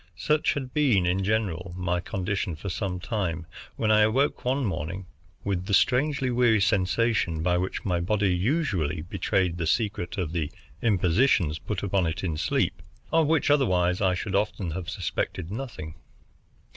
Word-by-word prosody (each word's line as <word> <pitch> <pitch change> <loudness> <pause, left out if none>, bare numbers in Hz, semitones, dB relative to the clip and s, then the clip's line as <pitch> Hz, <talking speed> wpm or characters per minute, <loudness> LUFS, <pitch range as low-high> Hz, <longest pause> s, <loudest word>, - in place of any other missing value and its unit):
Such 150 +7 +2
had 130 -3 -5
been, 125 -12 +3
in 90 +2 +1
general, 95 -4 -1
my 90 -1 0
condition 95 0 -2
for 95 +6 -6
some 90 0 -3
time, 90 -6 -2 0.3
when 110 -1 +1
I 110 0 +6
awoke 125 +7 +2
one 130 +2 0
morning 95 -1 -3 0.4
with 95 -2 -2
the 100 - +3
strangely 135 +3 +2
weary 120 -3 +4
sensation 100 -3 +1
by 90 0 +2
which 95 +1 -3
my 90 -3 +1
body 100 +1 +1
usually 90 - 0
betrayed 90 0 0
the 85 - -1
secret 105 -2 -1
of 90 -5 -2
the 80 -4 -2 0.3
impositions 90 - +2
put 105 -3 -4
upon 95 -3 +1
it 80 +3 -3
in 85 -4 -1
sleep, 75 - 0 0.3
of 165 -2 +3
which 160 -2 +2
otherwise 90 -11 +2
I 95 -2 +3
should 95 +2 -4
often 100 -3 0
have 90 +2 -5
suspected 95 -2 -3
nothing. 110 -10 -6
95 Hz, 160 wpm, -26 LUFS, 90-115 Hz, 0.4 s, I